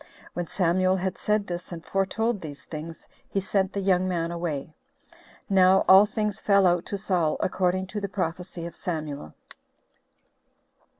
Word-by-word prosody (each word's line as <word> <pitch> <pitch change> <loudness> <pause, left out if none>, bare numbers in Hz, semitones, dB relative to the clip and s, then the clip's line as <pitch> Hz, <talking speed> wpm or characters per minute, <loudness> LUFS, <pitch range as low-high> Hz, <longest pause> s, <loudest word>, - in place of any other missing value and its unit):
When 175 -1 -3
Samuel 185 +1 +2
had 190 0 -2
said 210 -1 0
this, 175 -1 -6
and 165 -1 -7
foretold 205 +3 0
these 145 -4 -8
things, 160 +1 -8 0.2
he 195 - 0
sent 195 -1 0
the 200 - -2
young 185 -1 +2
man 170 -2 -1
away. 160 -4 -4 0.7
Now 190 -1 +5
all 195 +2 +8
things 210 -1 -2
fell 200 -2 +4
out 175 -1 +2
to 200 - -3
Saul 180 -6 0
according 185 0 0
to 210 - -2
the 200 - -3
prophecy 180 -1 -4
of 170 - -7
Samuel. 150 - -5
185 Hz, 155 wpm, -26 LUFS, 170-195 Hz, 0.7 s, all